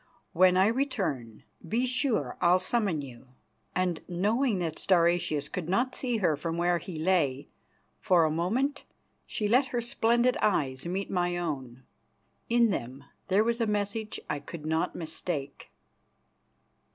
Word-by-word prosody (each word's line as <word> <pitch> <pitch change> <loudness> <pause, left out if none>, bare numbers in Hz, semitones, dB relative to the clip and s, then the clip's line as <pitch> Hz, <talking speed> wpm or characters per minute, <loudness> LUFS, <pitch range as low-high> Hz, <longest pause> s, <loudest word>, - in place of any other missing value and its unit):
When 185 +1 +5
I 190 - +5
return, 190 - -2 0.3
be 240 +4 +1
sure 250 - 0
I'll 175 +1 +5
summon 185 -5 0
you," 130 -1 -11 0.5
and, 180 -3 0
knowing 210 +6 +1
that 170 -3 -3
Stauracius 170 -5 +2
could 170 0 -5
not 245 +7 +1
see 245 -3 -1
her 175 -7 +2
from 165 +3 -4
where 175 0 +2
he 175 -2 -8
lay, 155 -5 +1 0.5
for 175 -3 +4
a 155 - +1
moment 240 - 0 0.4
she 210 - -2
let 255 +5 +4
her 245 - -2
splendid 235 +1 +2
eyes 140 -8 0
meet 190 +3 -3
my 175 -1 0
own. 130 -7 -4 0.7
In 235 -1 +4
them 130 -3 -4 0.2
there 195 +2 +3
was 235 +1 0
a 230 - +2
message 210 +1 -2
I 145 - -2
could 150 +2 -9
not 160 +1 0
mistake. 155 -4 -5
180 Hz, 145 wpm, -28 LUFS, 155-225 Hz, 0.7 s, When